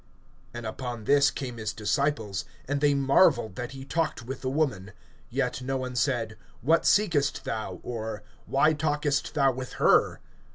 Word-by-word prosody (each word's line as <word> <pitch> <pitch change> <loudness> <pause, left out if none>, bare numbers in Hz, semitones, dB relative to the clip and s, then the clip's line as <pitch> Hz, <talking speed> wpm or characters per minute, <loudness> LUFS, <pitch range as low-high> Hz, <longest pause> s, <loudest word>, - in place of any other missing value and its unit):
(27)And 120 -2 -5
upon 120 0 -5
this 140 +4 +5
came 125 -3 -6
his 110 -1 -3
disciples; 110 -3 -1 0.2
and 140 +1 -1
they 145 -1 +4
marveled 135 - +3
that 120 +5 -5
he 135 0 -8
talked 155 -5 -1
with 130 +3 -6
the 130 - -2
woman[4:27]. 130 -9 -1 0.4
Yet - - -1
no 135 +1 -2
one 130 -1 -4
said: 120 -4 0 0.2
What 160 +5 +3
seekest 165 -9 +2
thou? 110 -5 -4
or, 110 -3 -5 0.2
Why 150 +3 +3
talkest 150 -1 -1
thou 135 -2 +4
with 130 0 -6
her? - - +3
130 Hz, 160 wpm, -27 LUFS, 115-145 Hz, 0.4 s, this